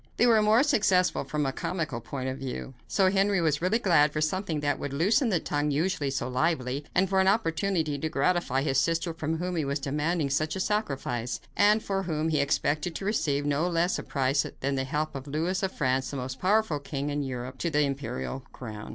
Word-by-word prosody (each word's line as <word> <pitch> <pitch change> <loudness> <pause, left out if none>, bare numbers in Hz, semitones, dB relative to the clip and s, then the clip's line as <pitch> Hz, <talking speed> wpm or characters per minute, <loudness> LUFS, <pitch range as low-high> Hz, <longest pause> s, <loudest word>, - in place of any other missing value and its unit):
They 240 - +4
were 225 -3 +5
more 215 +4 +5
successful 195 -10 +2
from 150 -1 -1
a 135 - 0
comical 155 -10 -3
point 130 +2 -5
of 130 +1 -4
view. 135 0 -5
So 190 -2 +3
Henry 195 0 +2
was 155 -3 +1
really 185 +6 +2
glad 165 -9 +4
for 150 - -2
something 160 +1 -1
that 145 -1 0
would 145 - -4
loosen 205 - +2
the 180 -5 +2
tongue 145 -1 -1
usually 150 0 0
so 130 -2 -2
lively, 130 0 0
and 185 +2 +4
for 190 0 +1
an 190 - +3
opportunity 175 -6 +1
to 160 - -2
gratify 140 -3 +1
his 135 -3 +2
sister 165 +4 0
from 160 0 -2
whom 180 +2 -3
he 160 - +1
was 140 +1 -1
demanding 150 +2 -1
such 155 +3 0
a - - -3
sacrifice, 135 - -2 0.2
and 210 +2 +4
for 195 -1 -1
whom 160 -3 -1
he 155 -2 +1
expected 150 +3 0
to 195 - -5
receive 145 -9 0
no 145 +4 +1
less 175 +2 +1
a - - -3
price 135 0 +1 0.2
than 140 +1 0
the 135 -1 -1
help 150 +3 -2
of 135 0 -7
Louis 165 +6 -1
of 190 -1 -1
France, 130 -2 0
the 140 - -5
most 130 0 -5
powerful 195 -5 +2
king 140 0 -4
of 145 0 -1
Europe, 130 -1 -5
to 170 - 0
the 150 -2 +2
imperial 135 - -3
crown. 110 -4 -8
155 Hz, 220 wpm, -28 LUFS, 140-185 Hz, 0.2 s, were